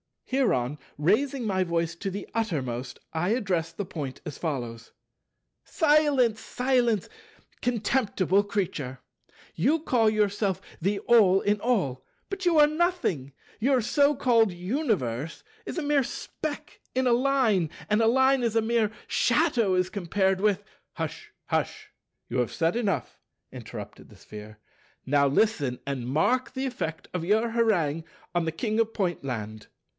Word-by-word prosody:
Hereon, 150 - 0 0.2
raising 240 - +1
by 190 -3 +1
voice 170 -1 -1
to 195 - -3
the 195 +2 -6
uttermost, 130 - -2
I 165 +3 0
addressed 180 -8 -1
the 205 - -3
Point 145 -7 -6
as 145 - -6
follows: 120 -8 -4 0.7
"Silence, 290 - +3
silence, 245 -4 0 0.5
contemptible 210 -5 +1
Creature. 165 -11 -3 0.6
You 290 - +2
call 235 -8 +3
yourself 205 -2 0 0.2
the 200 +4 0
All 200 -4 +5
in 210 0 +1
All, 180 - 0 0.3
but 390 -1 -4
you 340 -2 +4
are 300 - +8
the 300 - -4
Nothing: 310 - 0 0.3
your 260 +2 +3
so 285 +5 +3
called 230 -6 +3
Universe 175 - -2 0.2
is - - -5
a 335 - -1
mere 290 -1 +3
speck 300 +4 -6 0.2
in 260 0 +2
a 245 - +4
Line, 240 - +2 0.2
and 210 +2 +3
a 225 - +4
Line 265 +2 +4
is 230 -2 0
a 225 - +4
mere 225 -1 +1 0.2
shadow 245 - +2
as 180 0 +1
compared 190 0 0
with—" 205 0 +1 0.3
"Hush, - - -5 0.2
hush, - - -2 0.4
you - - -2
have 125 -2 0
said 165 +3 +1
enough," 210 -5 -2 0.3
interrupted - - -9
the - - -16
Sphere, 105 0 -11 0.5
"now 140 +1 +3
listen, 140 - +1
and 135 -3 -3
mark 245 - +1
the 265 +1 -2
effect 205 - -4
of 175 -2 -2
your 220 +4 +2
harangue 175 -10 +1 0.3
on 175 -1 +1
the 160 - 0
King 215 +6 -1
of 225 0 +1
Pointland." 125 - -3
205 Hz, 145 wpm, -27 LUFS, 160-245 Hz, 0.7 s, are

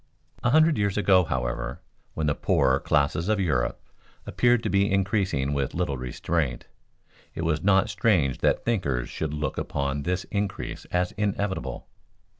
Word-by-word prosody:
A 120 - +2
hundred 155 +1 +4
years 100 -1 0
ago, 95 -3 +5
however, 65 -3 -3 0.4
when 80 - -1
the 75 - +2
poorer 65 -1 +2
classes 75 +5 +1
of 110 -1 +2
Europe 65 -9 0 0.5
appeared 120 -1 +2
to 110 - -1
be 100 0 +2
increasing 95 -8 0
with 70 -2 -2
little 85 -5 -1
restraint, 65 +2 -2 0.7
it 80 - -3
was 80 -2 0
not 95 0 +4
strange 80 - +1
that - - +1
thinkers 70 - -1
should 80 -2 -3
look 75 0 -3
upon 70 0 -2
this 90 +5 -1
increase 100 -2 -3
as 90 0 -1
inevitable. 100 -1 -2
90 Hz, 150 wpm, -26 LUFS, 70-100 Hz, 0.7 s, ago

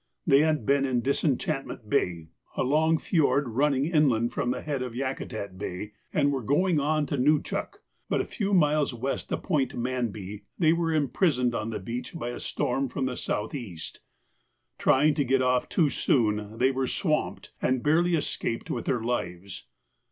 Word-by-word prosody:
They 135 - +6
had 155 -6 +2
been 140 +2 +3
up 135 - 0
in 125 -2 +1
Disenchantment 135 - -1
Bay, 85 -5 0 0.3
a - - +2
long 155 +4 +3
fiord 145 -5 +2
running 135 +3 +2
inland 130 -8 +2
from 120 - -1
the - - -2
head 145 -4 -2
of 125 -2 -4
Yakutat 110 -7 -4
Bay, 95 +3 -5 0.2
and 145 -1 +2
were 135 -2 -1
going 160 - +2
on 150 +1 +1
to 145 - -2
Nuchuk, 150 +3 0 0.3
but - - +1
a - - 0
few 200 -1 -3
miles 150 -7 +3
west 130 +4 -3
of - - -2
Point 150 -8 0
Manby 110 -5 -3
they 160 -2 +4
were 165 -1 0
imprisoned 145 -4 +1
on 110 -1 -2
the 110 - -3
beach 120 - -6
by 135 -7 -3
a 120 - -5
storm 135 +2 -1
from 130 +1 -2
the 130 -1 -2
south 105 - -3
east. 100 - -7 0.8
Trying 150 +3 +4
to 145 -1 +1
get 130 0 +2
off 125 0 +1
too 155 -5 +2
soon, 105 -3 +1
they 130 +3 +3
were 130 0 -1
swamped, 155 +1 -1
and 130 -1 +1
barely 170 +3 +3
escaped 120 -6 -3
with 120 - -3
their 125 -3 0
lives. 95 -5 -4
130 Hz, 180 wpm, -27 LUFS, 120-150 Hz, 0.8 s, They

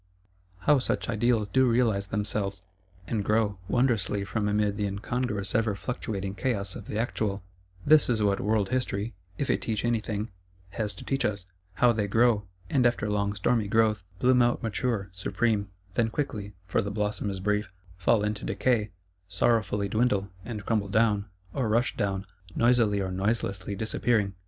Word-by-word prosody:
How 145 +4 +4
such 125 - -1
Ideals 115 -1 +2
do 130 -1 +4
realise 115 -5 +2
themselves; 100 -2 -2 0.4
and 105 0 -1
grow, 105 -2 +1
wondrously, 105 -5 +1
from 105 +1 -1
amid 105 -1 +1
the 105 -1 -1
incongruous 105 0 -2
ever 110 -2 +2
fluctuating 100 -1 -4
chaos 100 -4 -2
of - - -8
the 105 - -3
Actual: 105 -4 -1 0.4
this 155 -2 +6
is 110 -3 +2
what 100 -1 +2
World 105 -1 +1
History, 120 -4 -1 0.2
if 140 - -1
it - - +1
teach 110 -1 -2
any 120 -1 +2
thing, 105 0 -4 0.4
has 105 +1 -3
to - - -9
teach 135 0 0
us, 100 -3 -1 0.3
How 120 +6 +4
they 110 -3 0
grow; 110 -1 +3 0.2
and, 125 +4 +3
after 120 -3 -1
long 100 -1 0
stormy 110 +1 +1
growth, 110 -2 +2
bloom 125 +3 +4
out 120 +1 +2
mature, 110 -2 -1
supreme; 100 +2 0 0.2
then 115 +1 +2
quickly 110 -6 -3
(for 95 - +1
the 100 - -3
blossom 105 0 -1
is 95 -1 -4
brief) 105 0 0 0.2
fall 100 +4 +2
into 105 -1 -2
decay; 115 -5 +1 0.4
sorrowfully 105 -1 +1
dwindle; 100 -2 +1
and 110 -3 -6
crumble 105 -4 0
down, 105 -1 +2 0.3
or 125 -5 0
rush 120 +5 +2
down, 100 -2 -1 0.3
noisily 115 -4 +3
or 95 -1 -2
noiselessly 100 0 -1
disappearing. 110 -1 +1
105 Hz, 165 wpm, -28 LUFS, 100-115 Hz, 0.4 s, this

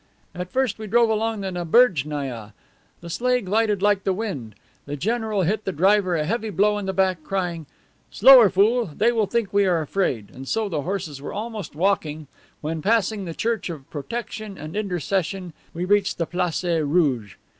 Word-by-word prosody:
At 180 0 -6
first 260 -5 0
we 215 - -6
drove 230 +2 +3
along 220 -1 -1
the 190 -1 -3
Naberjnaia. 150 - +1 0.5
The 170 - -9
sleigh 250 +5 +1
glided 210 0 0
like 205 -2 +3
the 190 - +1
wind. 180 - -5 0.3
The 145 - -3
general 220 - -1
hit 210 +5 0
the 190 - -2
driver 190 +2 +3
a 155 -2 0
heavy 225 +5 -2
blow 210 +2 +2
in 200 - -5
the - - 0
back, 185 -3 0
crying, 175 -4 -3 0.4
'Slower, 250 -2 +8
fool; 215 +5 +3
they 210 +9 +1
will 220 -3 +1
think 230 -4 -1
we 200 -1 +3
are 175 -2 +2
afraid,' 150 - -2
and 135 +1 -10
so 220 +6 0
the 160 -7 -2
horses 165 -5 -4
were 145 - -6
almost 215 -7 -6
walking 160 -4 0 0.4
when, 155 +1 -3
passing 215 +1 +1
behind 190 - -6
the 165 - -6
Church 225 -4 -1
of 150 -5 -8
Protection 210 - -6
and 155 +3 -8
intercession, 190 -2 -2 0.2
we 175 +2 -3
reached 200 0 +2
the 165 - 0
Place 180 0 -2
Rouge. 150 - +1
190 Hz, 185 wpm, -23 LUFS, 160-215 Hz, 0.5 s, Slower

